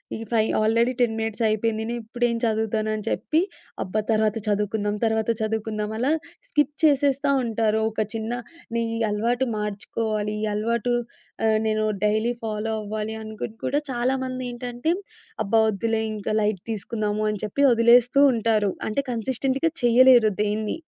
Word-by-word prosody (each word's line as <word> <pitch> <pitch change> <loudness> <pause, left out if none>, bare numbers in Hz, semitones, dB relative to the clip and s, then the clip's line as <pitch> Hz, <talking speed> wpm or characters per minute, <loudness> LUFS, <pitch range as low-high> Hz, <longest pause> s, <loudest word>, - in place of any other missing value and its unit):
ఈ - - -6
5 220 -1 +2
already 230 +3 +3
10 230 -2 +2
minutes 225 +1 -2
అయిపోయింది. 220 +1 0
నేనిప్పుడేం 240 0 -1
చదువుతాను 220 -1 0
అని 215 - -6
చెప్పి, 320 +2 +1 0.4
అబ్బా! 215 +4 -1
తర్వాత 215 0 +2
చదువుకుందాం, 210 0 0
తర్వాత 220 0 0
చదువుకుందాం 215 -1 -2
అలా 265 +4 +2 0.4
స్కిప్ 295 -1 +1
చేసేస్తా 280 -1 +3
ఉంటారు. 220 -1 +1
ఒక 215 - -2
చిన్న 225 +1 -3 0.4
నీ 230 - +1 0.3
అలవాటు 240 +5 0
మార్చుకోవాలి, 210 +1 -2
ఈ - - 0
అలవాటు 235 +3 0 0.5
ఆహ్, 220 0 +4
నేను 215 0 +1 0.2
డైలీ 215 +3 +2
ఫాలో 220 0 -2
అవ్వాలి 215 +1 -4
అనుకుని 220 0 -7 0.3
కూడా 285 - +1
చాలా 245 +2 +1
మందేంటంటే, 250 +2 -3 0.5
అబ్బా! 225 +3 +3
వద్దులే 220 +2 -1
ఇంక 210 -2 -5
లైట్ 210 -3 0
తీసుకుందాము 215 0 -2
అని 210 - -4
చెప్పి 245 +7 -2
వదిలేస్తూ 240 +3 +5
ఉంటారు. 220 -3 +1 0.2
అంటే 220 +6 0
కన్సిస్టెంట్‌గా 260 +6 0
చేయలేరు 240 -1 +6
దేన్నీ. 210 +1 -1
220 Hz, 140 wpm, -24 LUFS, 215-240 Hz, 0.5 s, చేయలేరు